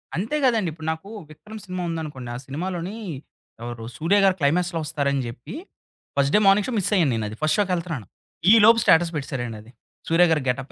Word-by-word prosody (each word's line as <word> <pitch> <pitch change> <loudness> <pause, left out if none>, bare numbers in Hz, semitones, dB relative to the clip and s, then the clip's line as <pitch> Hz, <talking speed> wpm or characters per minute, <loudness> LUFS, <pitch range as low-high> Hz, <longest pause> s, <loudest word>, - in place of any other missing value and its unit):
అంతే 215 - -2
గదండి! 225 -8 +2
ఇప్పుడు 160 0 -9
నాకు 160 +5 -7 0.2
'విక్రమ్' 215 +7 -11
సినిమా 185 -1 -4
ఉందనుకోండి 150 -7 -5
ఆ - - -4
సినిమాలోని, 180 +7 -4 0.7
ఎవరు 120 -1 -6
సూర్యగారు 195 +3 +3
క్లైమాక్స్‌లో 170 +3 +1
వస్తారని 140 -3 -1
జెప్పి 120 - -9 0.6
first 140 0 +2
day - - +6
morning 195 +1 +4
show 255 - -3
miss 195 - -1
అయ్యాను 160 -8 +3
నేను 110 -1 -2
అది 110 - -8
ఫస్ట్ 155 +5 +2
షో‌కి 195 -3 +1
ఎళ్తున్నాను. 165 - -5 0.4
ఈ - - +9
లోపు 230 +1 +7
స్టేటస్ 165 +1 +4
పెట్టేసారండి 130 -6 -4
అది. 115 +3 -17 0.4
సూర్యగారి 165 -2 +4
గెటప్ 130 +2 -3
165 Hz, 180 wpm, -23 LUFS, 140-185 Hz, 0.7 s, ఈ